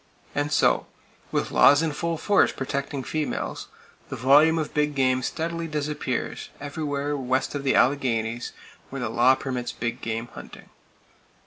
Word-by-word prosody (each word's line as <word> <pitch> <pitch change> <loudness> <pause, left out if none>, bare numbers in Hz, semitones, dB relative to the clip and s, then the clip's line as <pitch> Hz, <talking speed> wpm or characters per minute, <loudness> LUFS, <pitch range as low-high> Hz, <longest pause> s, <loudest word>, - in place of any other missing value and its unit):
And 145 0 -1
so, - - +3 0.4
with - - -1
laws 145 +3 +6
in 160 - 0
full 165 +2 -2
force 205 +5 +3
protecting 140 +1 -3
females, 155 +3 -3 0.4
the - - -4
volume 145 +6 +5
of 155 -2 -3
big 150 -1 0
game 130 -1 +2
steadily 165 +5 -3
disappears, 150 -1 -3
everywhere 145 0 -3
west 130 -1 -1
of 145 -1 -3
the 135 - +2
Alleghanies 120 -4 +1 0.4
where 135 - -6
the 120 - -2
law 120 +3 +4
permits 125 -3 -4
big 120 +1 -4
game 115 0 -3
hunting! - - -11
140 Hz, 145 wpm, -25 LUFS, 130-150 Hz, 0.4 s, laws